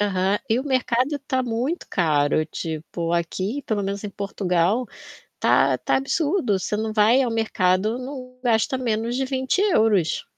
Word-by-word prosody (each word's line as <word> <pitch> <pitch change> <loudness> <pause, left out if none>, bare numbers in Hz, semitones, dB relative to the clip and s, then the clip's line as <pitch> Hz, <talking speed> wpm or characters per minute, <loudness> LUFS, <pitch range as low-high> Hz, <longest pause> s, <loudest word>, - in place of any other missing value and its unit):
Aham, 195 0 +1
e 225 - +2
o 265 - -3
mercado 260 +1 +1
está 265 -2 -2
muito 250 +8 -2
caro, 155 -3 +2
tipo, 165 +1 -4
aqui, 185 - -2
pelo 215 -4 -2
menos 200 +1 -3
em 210 - -4
Portugal, 195 +3 0 0.5
está - - +3
está - - 0
absurdo, 285 - 0
você 210 - -2
não 220 +1 -2
vai 220 +5 +4
ao 245 - -1
mercado, 215 -1 +1
não 255 -1 -8
gasta 235 +1 +1
menos 235 -1 -1
de 265 - 0
€20. 260 - +1
220 Hz, 150 wpm, -23 LUFS, 190-255 Hz, 0.5 s, vai